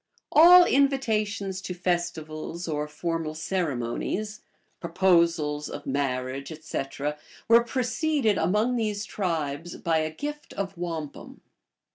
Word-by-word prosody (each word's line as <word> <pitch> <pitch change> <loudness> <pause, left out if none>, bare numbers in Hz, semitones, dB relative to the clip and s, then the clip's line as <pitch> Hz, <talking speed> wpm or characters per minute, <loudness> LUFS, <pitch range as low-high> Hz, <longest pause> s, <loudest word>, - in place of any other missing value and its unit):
So - - +5
1 340 - +9
All 360 0 +10
invitations 220 - +1
to 180 - -5
festivals, 170 -2 -3
or 150 -1 -2
formal 165 0 -3
ceremonies, 175 - -2 0.4
proposals 170 -4 +2
>f 145 - -7
marriage, 135 0 -2
etc., 150 -1 -4 0.3
were 235 +1 +6
preceded 250 - 0
among 210 +9 +1
these 210 -3 -1
tribes 165 -4 -3
by 165 -1 +1
a 155 0 -1
gift 295 - -7
of 195 -1 -4
wampum. 165 -4 -6
175 Hz, 115 wpm, -26 LUFS, 155-215 Hz, 0.4 s, All